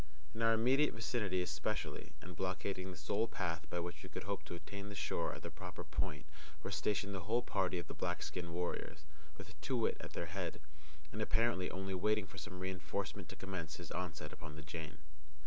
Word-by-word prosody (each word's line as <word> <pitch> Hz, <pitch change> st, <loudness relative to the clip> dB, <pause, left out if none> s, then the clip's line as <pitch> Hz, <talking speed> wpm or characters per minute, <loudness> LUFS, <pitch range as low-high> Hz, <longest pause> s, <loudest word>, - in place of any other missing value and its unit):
In 115 Hz, -, -3 dB
our 115 Hz, 0 st, +7 dB
immediate 130 Hz, +6 st, +6 dB
vicinity 105 Hz, -5 st, +2 dB
especially, 90 Hz, +5 st, -1 dB
and 90 Hz, +1 st, -6 dB
blockading 95 Hz, +1 st, 0 dB
the 90 Hz, -, -6 dB
sole 95 Hz, +8 st, +2 dB
path 85 Hz, -7 st, -1 dB
by 85 Hz, -, +1 dB
which 85 Hz, +1 st, -3 dB
we 95 Hz, -, -7 dB
could 95 Hz, -, -3 dB
hope 100 Hz, 0 st, -1 dB
to -, -, -4 dB
attain 100 Hz, +3 st, -5 dB
the 100 Hz, -, -5 dB
shore -, -, +1 dB
at -, -, -7 dB
the -, -, -3 dB
proper -, -, -5 dB
point 75 Hz, -1 st, -1 dB, 0.4 s
were -, -, -1 dB
stationed 100 Hz, -1 st, +2 dB
the 95 Hz, -, 0 dB
whole 115 Hz, +3 st, +4 dB
party 95 Hz, -5 st, +2 dB
of 85 Hz, -, -1 dB
the -, -, -5 dB
black -, -, 0 dB
skin 85 Hz, -2 st, -2 dB
warriors, 90 Hz, +1 st, -1 dB, 0.3 s
with -, -, -8 dB
Too -, -, +2 dB
wit -, -, +3 dB
at -, -, -6 dB
their 85 Hz, -, 0 dB
head, 90 Hz, +2 st, -2 dB, 0.5 s
and 110 Hz, -, -2 dB
apparently 110 Hz, -3 st, +4 dB
only 95 Hz, +1 st, -1 dB
waiting 105 Hz, +3 st, +4 dB
for 85 Hz, -, -6 dB
some 90 Hz, -, -5 dB
re 95 Hz, +1 st, +1 dB
enforcement 90 Hz, +1 st, -2 dB
to -, -, -5 dB
commence 85 Hz, -6 st, -3 dB
his 85 Hz, -, -7 dB
onset 80 Hz, -4 st, -2 dB
upon 80 Hz, -4 st, -7 dB
the 80 Hz, -, -6 dB
Jane. 75 Hz, 0 st, -4 dB
95 Hz, 210 wpm, -39 LUFS, 85-100 Hz, 0.5 s, our